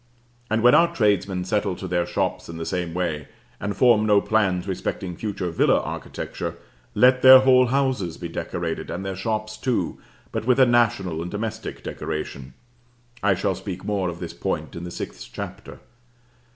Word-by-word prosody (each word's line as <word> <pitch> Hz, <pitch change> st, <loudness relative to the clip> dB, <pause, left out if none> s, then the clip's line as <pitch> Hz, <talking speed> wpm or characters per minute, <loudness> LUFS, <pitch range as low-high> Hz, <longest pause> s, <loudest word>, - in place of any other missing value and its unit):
And 110 Hz, +1 st, +1 dB
when 125 Hz, -, +7 dB
our 170 Hz, 0 st, +4 dB
tradesmen 100 Hz, -4 st, +1 dB
settle 100 Hz, -1 st, 0 dB
to 95 Hz, -, -6 dB
their 85 Hz, -1 st, 0 dB
shops -, -, -2 dB
in 85 Hz, -, -7 dB
the 80 Hz, -, -4 dB
same 90 Hz, -2 st, -3 dB
way, 80 Hz, -6 st, -2 dB, 0.3 s
and 100 Hz, 0 st, -3 dB
form 120 Hz, -4 st, +5 dB
no 105 Hz, -1 st, +5 dB
plans 100 Hz, -4 st, +1 dB
respecting 95 Hz, -1 st, -3 dB
future 95 Hz, -3 st, -3 dB
villa 80 Hz, -, +3 dB
architecture, -, -, -5 dB, 0.4 s
let 130 Hz, 0 st, +5 dB
their 130 Hz, 0 st, +10 dB
whole 130 Hz, -1 st, +5 dB
houses 130 Hz, -10 st, 0 dB
be 85 Hz, -, -5 dB
decorated, 85 Hz, -, -4 dB
and 95 Hz, +3 st, -4 dB
their 95 Hz, -1 st, -3 dB
shops 110 Hz, +2 st, -3 dB
too, 125 Hz, +2 st, -1 dB, 0.3 s
but 110 Hz, -1 st, -3 dB
with 130 Hz, +1 st, +4 dB
a 130 Hz, -, +8 dB
national 105 Hz, -9 st, +2 dB
and 85 Hz, -, -4 dB
domestic 110 Hz, +2 st, -5 dB
decoration 70 Hz, -3 st, -5 dB, 0.7 s
(I 100 Hz, -1 st, +3 dB
shall 95 Hz, +1 st, 0 dB
speak 95 Hz, 0 st, -7 dB
more 100 Hz, -3 st, 0 dB
of 85 Hz, 0 st, -7 dB
this 85 Hz, -2 st, -6 dB
point -, -, -3 dB
in 85 Hz, -, -6 dB
the -, -, -5 dB
sixth -, -, -7 dB
chapter). -, -, -7 dB
100 Hz, 175 wpm, -24 LUFS, 90-110 Hz, 0.7 s, their